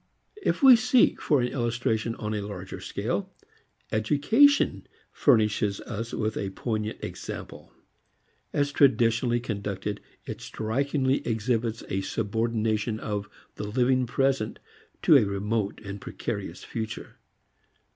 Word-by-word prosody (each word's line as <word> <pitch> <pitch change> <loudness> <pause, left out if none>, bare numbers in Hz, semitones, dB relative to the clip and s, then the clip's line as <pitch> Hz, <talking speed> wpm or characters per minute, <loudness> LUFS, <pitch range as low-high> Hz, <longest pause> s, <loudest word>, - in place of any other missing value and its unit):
If - - 0
we 265 -2 +10
seek 250 +1 +3
for 145 -4 +3
an 125 - 0
illustration 120 -2 -1
on 105 0 -4
a 105 - -1
larger 100 -2 -7
scale, - - -3 0.6
education 150 - +3 0.2
furnishes 105 -6 +2
us 115 0 -5
with 110 0 -2
a 100 - -2
poignant 110 +2 -3
example. - - -7 0.8
As 145 0 +1
traditionally 120 -3 +3
conducted, 105 -3 -4 0.2
it - - -6
strikingly 135 +4 0
exhibits 115 0 -1
a 95 - -1
subordination 110 +1 -1
of 105 -3 -3 0.3
the 105 - -4
living 125 +3 +2
present 135 -2 0 0.5
to - - +8
a - - +4
remote 100 +1 -1
and 100 0 -6
precarious - - -5
future. 110 -1 -6
115 Hz, 115 wpm, -27 LUFS, 105-130 Hz, 0.8 s, we